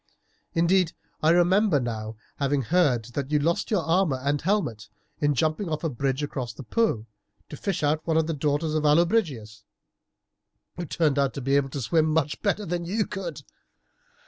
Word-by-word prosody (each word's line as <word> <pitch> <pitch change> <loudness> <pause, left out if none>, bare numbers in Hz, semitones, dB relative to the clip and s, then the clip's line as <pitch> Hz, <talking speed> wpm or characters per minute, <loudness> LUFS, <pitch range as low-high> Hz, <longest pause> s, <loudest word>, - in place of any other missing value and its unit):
Indeed, 170 0 +2 0.3
I 155 - +3
remember 175 0 +4
now 110 -3 -4 0.2
having 140 -1 0
heard 140 -6 +2
that 140 0 -3
you 150 - +2
lost 165 +4 0
your 205 -6 +1
armour 165 -4 +2
and 140 +2 -1
helmet 125 - -1 0.3
in 145 -1 +2
jumping 160 - 0
off 155 -1 -2
the 165 - -1
bridge 135 +3 -1
across 130 -4 -4
the - - -9
Po 130 - 0 0.4
to - - -7
fish 195 0 -3
out 150 +2 0
one 160 -1 +2
of 160 - +3
the 165 - -2
daughters 150 +2 0
of 155 -1 0
Allobrigius, 150 - +1 1.1
who 175 -2 -5
turned 150 -2 +1
out 140 -1 +1
to 140 - -4
be 135 +2 +1
able 140 -1 +2
to 135 +1 -5
swim 155 +7 +2
much 155 -1 0
better 205 0 0
than 175 0 -2
you 205 +5 0
could. 185 -5 -6
155 Hz, 180 wpm, -26 LUFS, 135-170 Hz, 1.1 s, remember